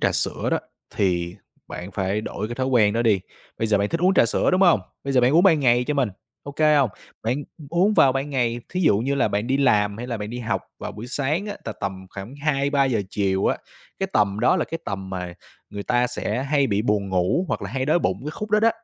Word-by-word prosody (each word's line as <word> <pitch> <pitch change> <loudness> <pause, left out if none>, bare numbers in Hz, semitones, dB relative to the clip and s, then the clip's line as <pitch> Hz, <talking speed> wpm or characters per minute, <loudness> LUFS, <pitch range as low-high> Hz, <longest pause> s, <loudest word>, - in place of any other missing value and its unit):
trà - - +2
sữa - - -1
đó, - - +2 0.4
thì 90 -1 0 0.3
bạn 90 +3 -7
phải 95 +2 -1
đổi 105 0 -5
cái 120 - -4
thói 130 +1 -1
quen 110 -6 +4
đó 115 +1 +1
đi. 105 -5 +3 0.4
Bây 115 - 0
giờ 105 -2 +2
bạn 100 - 0
thích 165 - -2
uống 185 +2 +4
trà 120 - +5
sữa, - - +1
đúng 185 +1 +2
hông? 170 - +5 0.2
Bây 140 - -2
giờ 130 - +4
bạn 125 +2 +3
uống 170 +3 +5
ban 165 -6 +5
ngày 125 -1 +3
cho 150 - -1
mình, 135 -5 +2 0.3
OK 140 0 -9 0.2
hông? 135 -7 +3 0.3
Bạn, 120 +4 0 0.2
ừm, 150 - -11
uống 185 +6 +3
vào 135 -8 +5
ban 135 +2 -2
ngày, 120 -3 0
thí 185 - -3
dụ 105 - +4
như 135 +5 0
là 135 - +2
bạn 105 +3 -1
đi 135 +1 +1
làm 105 -7 +2
hay 120 - -5
là 120 -2 -3
bạn 105 +1 -5
đi 120 - -5
học 115 -3 -2 0.2
vào - - -6
buổi 110 +3 -8
sáng 145 +9 -1
á, 205 - -5
tà 115 - -4
tầm 95 -2 -5
khoảng 100 +7 -8
2:00-3:00 140 -5 +1
chiều 95 -2 0
á, - - +2 0.4
cái 195 - 0
tầm 105 0 +2
đó 125 +9 +4
là 165 - 0
cái 165 - -5
tầm 95 -1 -5
mà 90 -2 -5 0.4
người 100 0 -5
ta 120 +3 +2
sẽ 125 0 -2
hay 140 -1 +2
bị 100 0 0
buồn 105 -3 0
ngủ 95 - +1
hoặc - - -2
là - - -5
hay 130 0 -1
đói 155 +3 +3
bụng - - -1
cái 150 - -3
khúc 210 +6 -6
đó 210 0 +4
đó. 230 - +5
120 Hz, 260 wpm, -23 LUFS, 105-140 Hz, 0.4 s, trà